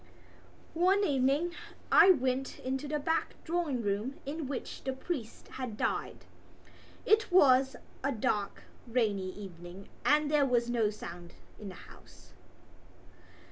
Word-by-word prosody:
One 370 Hz, +4 st, +3 dB
evening 285 Hz, +4 st, +1 dB, 0.4 s
I -, -, +8 dB
went 265 Hz, -5 st, +2 dB
into 265 Hz, +3 st, -3 dB
the 300 Hz, +1 st, -1 dB
back 320 Hz, +3 st, -1 dB
drawing 320 Hz, -8 st, -1 dB
room 210 Hz, +6 st, -1 dB
in 295 Hz, +1 st, -4 dB
which 275 Hz, -1 st, -6 dB
the 265 Hz, -, -2 dB
priest 260 Hz, -5 st, -5 dB
had 250 Hz, -5 st, -6 dB
died. -, -, -2 dB, 0.8 s
It 435 Hz, -1 st, +3 dB
was 270 Hz, -6 st, +5 dB, 0.3 s
a 275 Hz, -, +1 dB
dark 210 Hz, -4 st, -1 dB, 0.2 s
rainy 210 Hz, -6 st, 0 dB
evening 180 Hz, -1 st, -10 dB
and 300 Hz, 0 st, +3 dB
there 290 Hz, -2 st, +4 dB
was 240 Hz, -1 st, +1 dB
no 230 Hz, -3 st, +2 dB
sound 175 Hz, -4 st, -9 dB, 0.2 s
in 205 Hz, -, -7 dB
the 185 Hz, -, -9 dB
house. -, -, -16 dB
260 Hz, 130 wpm, -31 LUFS, 215-300 Hz, 0.8 s, I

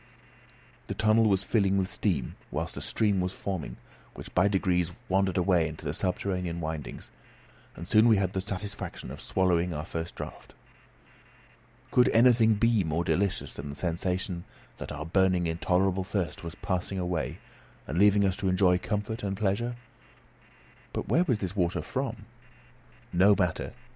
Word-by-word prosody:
The -, -, -4 dB
tunnel 110 Hz, 0 st, +4 dB
was 95 Hz, -1 st, +2 dB
filling 100 Hz, -3 st, +2 dB
with 95 Hz, -1 st, +1 dB
steam, 85 Hz, -, -1 dB
whilst -, -, -3 dB
a -, -, -5 dB
stream 100 Hz, -4 st, +1 dB
was 90 Hz, +1 st, -2 dB
forming, 80 Hz, -12 st, -4 dB, 0.4 s
which -, -, -10 dB
by 90 Hz, +2 st, +4 dB
degrees 90 Hz, -3 st, +1 dB, 0.2 s
wandered 95 Hz, 0 st, +1 dB
away 90 Hz, -3 st, +3 dB
into 75 Hz, -1 st, -5 dB
subterranean 90 Hz, -1 st, -2 dB
windings, 80 Hz, -4 st, -6 dB, 0.6 s
and 85 Hz, -, -8 dB
soon 110 Hz, +3 st, +5 dB
we 110 Hz, -3 st, +6 dB
had 95 Hz, -1 st, 0 dB
the 95 Hz, -, -1 dB
satisfaction 100 Hz, 0 st, -5 dB
of -, -, -8 dB
swallowing 90 Hz, -2 st, +1 dB
our 75 Hz, +1 st, -4 dB
first 80 Hz, 0 st, -5 dB
draught. -, -, -9 dB, 1.4 s
Could 125 Hz, -, +5 dB
anything 115 Hz, -2 st, +5 dB
be 115 Hz, -1 st, +3 dB
more 80 Hz, +1 st, -1 dB
delicious 100 Hz, +2 st, 0 dB
than 70 Hz, 0 st, -7 dB
the 70 Hz, -, -6 dB
sensation 90 Hz, +1 st, -2 dB, 0.3 s
that -, -, -6 dB
our 75 Hz, +1 st, -5 dB
burning 90 Hz, 0 st, +2 dB
intolerable 90 Hz, +3 st, +1 dB
thirst 90 Hz, -5 st, -3 dB
was 85 Hz, -1 st, -6 dB
passing 95 Hz, +1 st, -2 dB
away, 90 Hz, -3 st, -2 dB, 0.5 s
and 80 Hz, +7 st, -2 dB
leaving 100 Hz, 0 st, +5 dB
us 95 Hz, -1 st, +1 dB
to 95 Hz, -, 0 dB
enjoy 90 Hz, -1 st, +3 dB
comfort 105 Hz, +3 st, -3 dB
and 100 Hz, -1 st, -3 dB
pleasure? 110 Hz, +4 st, 0 dB, 1.2 s
But -, -, -4 dB
where 175 Hz, +3 st, +3 dB
was 125 Hz, -9 st, +1 dB
this 95 Hz, -1 st, -4 dB
water 90 Hz, -2 st, 0 dB
from? 130 Hz, -3 st, -4 dB, 0.9 s
No 95 Hz, +4 st, +6 dB
matter. 90 Hz, -4 st, -1 dB
95 Hz, 155 wpm, -28 LUFS, 85-100 Hz, 1.4 s, we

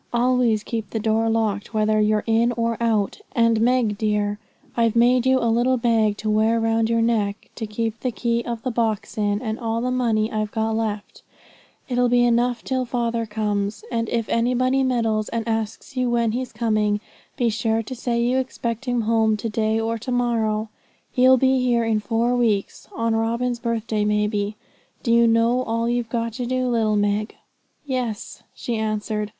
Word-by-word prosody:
Always 240 Hz, -3 st, +2 dB
keep 225 Hz, -4 st, -4 dB
the 225 Hz, -, -3 dB
door 220 Hz, +1 st, +1 dB
locked, 220 Hz, -1 st, -1 dB
whether 215 Hz, 0 st, +2 dB
you're 210 Hz, 0 st, +2 dB
in 230 Hz, +2 st, +2 dB
or 230 Hz, 0 st, -1 dB
out; 220 Hz, -, 0 dB
and, 230 Hz, -2 st, +3 dB
Meg 235 Hz, -4 st, +2 dB
dear, 210 Hz, -1 st, 0 dB, 0.4 s
I've 230 Hz, -1 st, +2 dB
made 245 Hz, +2 st, +4 dB
you 260 Hz, 0 st, +4 dB
a 245 Hz, -, -1 dB
little 240 Hz, +3 st, +2 dB
bag 225 Hz, -3 st, +2 dB
to 215 Hz, -, -3 dB
wear 220 Hz, +2 st, +2 dB
round 225 Hz, 0 st, +1 dB
your 230 Hz, 0 st, +2 dB
neck, 210 Hz, -3 st, -1 dB
to 220 Hz, -, -5 dB
keep 225 Hz, +1 st, -3 dB
the 255 Hz, -, -1 dB
key 235 Hz, 0 st, -1 dB
of 235 Hz, -2 st, -5 dB
the 255 Hz, -, -1 dB
box 225 Hz, -3 st, -1 dB
in, 205 Hz, +1 st, 0 dB
and 220 Hz, -1 st, -3 dB
all 230 Hz, -1 st, -1 dB
the 250 Hz, +2 st, -1 dB
money 230 Hz, -3 st, +1 dB
I've 215 Hz, -1 st, -1 dB
got 220 Hz, +1 st, -1 dB
left; 215 Hz, -2 st, -4 dB, 0.7 s
it'll 245 Hz, -1 st, +1 dB
be 245 Hz, 0 st, +4 dB
enough 240 Hz, 0 st, +1 dB
till 260 Hz, -1 st, -1 dB
father 235 Hz, -2 st, -2 dB
comes. 210 Hz, -1 st, -2 dB
And 230 Hz, -1 st, -1 dB
if 230 Hz, -2 st, -1 dB
anybody 250 Hz, +3 st, +1 dB
meddles, 225 Hz, -4 st, 0 dB
and 230 Hz, 0 st, -3 dB
asks 225 Hz, +4 st, -3 dB
you 255 Hz, -1 st, 0 dB
when 235 Hz, -2 st, +1 dB
he's 250 Hz, +2 st, -3 dB
coming, 215 Hz, -2 st, 0 dB, 0.4 s
be 240 Hz, -3 st, +2 dB
sure 225 Hz, 0 st, 0 dB
say 235 Hz, -1 st, -1 dB
you 250 Hz, +2 st, +2 dB
expect 235 Hz, -1 st, -4 dB
him 245 Hz, -2 st, 0 dB
home 220 Hz, -1 st, +2 dB
to 225 Hz, +2 st, -3 dB
day 220 Hz, +1 st, 0 dB
or 225 Hz, 0 st, -2 dB
to 245 Hz, +3 st, -5 dB
morrow. 225 Hz, -3 st, 0 dB, 0.4 s
He'll 255 Hz, +1 st, +5 dB
be 265 Hz, +1 st, +3 dB
here 240 Hz, -2 st, +2 dB
in 225 Hz, -1 st, +1 dB
four 230 Hz, +3 st, 0 dB
weeks, 220 Hz, -5 st, 0 dB
on 230 Hz, 0 st, 0 dB
Robin's 235 Hz, +2 st, -1 dB
birthday, 230 Hz, -2 st, -1 dB
may 210 Hz, 0 st, +2 dB
be. 210 Hz, 0 st, -2 dB, 0.5 s
Do 230 Hz, -, +2 dB
you 235 Hz, 0 st, +5 dB
know 230 Hz, +2 st, +3 dB
all 230 Hz, -1 st, -1 dB
you've 240 Hz, -1 st, -1 dB
got 230 Hz, -1 st, -2 dB
to 245 Hz, -, -2 dB
do, 255 Hz, 0 st, 0 dB
little 220 Hz, -3 st, +1 dB
Meg?' 205 Hz, +1 st, 0 dB, 0.5 s
'Yes,' 250 Hz, -6 st, -4 dB
she 235 Hz, -2 st, -3 dB
answered. 215 Hz, -1 st, -2 dB
230 Hz, 185 wpm, -22 LUFS, 215-240 Hz, 0.7 s, He'll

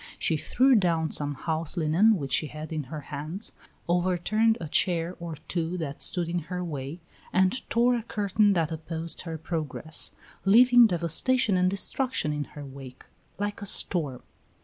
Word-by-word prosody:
She 160 Hz, -, 0 dB
threw 260 Hz, -, +2 dB
down 170 Hz, -7 st, +1 dB
some 145 Hz, -1 st, +2 dB
house 160 Hz, +4 st, -2 dB
linen 175 Hz, +7 st, +3 dB
which 140 Hz, -5 st, -4 dB
she 155 Hz, -, +2 dB
had 155 Hz, +2 st, -8 dB
in 155 Hz, -3 st, -3 dB
her 150 Hz, +3 st, -7 dB
hands, 155 Hz, +9 st, -3 dB, 0.4 s
overturned 185 Hz, +6 st, +1 dB
a 165 Hz, -, -6 dB
chair 170 Hz, +2 st, +1 dB
or 170 Hz, -2 st, -6 dB
two 170 Hz, 0 st, -2 dB
that 145 Hz, -4 st, -5 dB
stood 175 Hz, -2 st, -1 dB
in 175 Hz, +1 st, -2 dB
her 180 Hz, -1 st, -3 dB
way, 145 Hz, -1 st, -6 dB, 0.3 s
and 190 Hz, +7 st, +1 dB
tore 240 Hz, +2 st, +3 dB
a 235 Hz, -, -2 dB
curtain 205 Hz, -2 st, +1 dB
that 165 Hz, -3 st, 0 dB
opposed 165 Hz, +1 st, -3 dB
her 165 Hz, -2 st, -6 dB
progress, 160 Hz, -1 st, -3 dB, 0.3 s
leaving 240 Hz, +4 st, +6 dB
devastation 195 Hz, +6 st, +1 dB
and 180 Hz, 0 st, +2 dB
destruction 200 Hz, -, 0 dB
in 150 Hz, -1 st, -3 dB
her 145 Hz, -1 st, -10 dB
wake, 135 Hz, -2 st, -11 dB, 0.3 s
like 205 Hz, +1 st, -4 dB
a 205 Hz, -, -5 dB
storm. 150 Hz, -9 st, +4 dB
170 Hz, 165 wpm, -26 LUFS, 155-200 Hz, 0.4 s, leaving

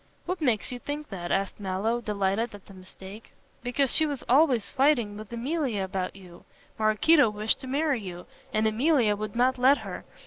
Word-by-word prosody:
"What 360 Hz, 0 st, -3 dB
makes 245 Hz, -7 st, +1 dB
you 250 Hz, -, -5 dB
think 295 Hz, +3 st, -6 dB
that?" 175 Hz, -3 st, -5 dB
asked 195 Hz, +2 st, -1 dB
Mallow, 205 Hz, +5 st, -1 dB
delighted 205 Hz, +1 st, -1 dB
at 200 Hz, -, -14 dB
the 195 Hz, -, -14 dB
mistake. 190 Hz, +3 st, -12 dB, 0.3 s
"Because 250 Hz, +2 st, 0 dB
she 315 Hz, -, +3 dB
was 285 Hz, -4 st, -4 dB
always 255 Hz, -4 st, +3 dB
fighting 260 Hz, -7 st, +2 dB
with 215 Hz, +1 st, -10 dB
Emilia 245 Hz, -, -2 dB
about 190 Hz, -1 st, -3 dB
you. 180 Hz, -3 st, -14 dB, 0.4 s
Maraquito 220 Hz, +6 st, +4 dB
wished 210 Hz, +1 st, -1 dB
to 265 Hz, -, -9 dB
marry 280 Hz, -2 st, 0 dB
you, 180 Hz, -2 st, -8 dB, 0.3 s
and 215 Hz, +1 st, +1 dB
Emilia 230 Hz, -1 st, +3 dB
would 210 Hz, 0 st, -6 dB
not 255 Hz, +1 st, +2 dB
let 265 Hz, +3 st, +5 dB
her. -, -, -6 dB
225 Hz, 180 wpm, -27 LUFS, 200-270 Hz, 0.4 s, let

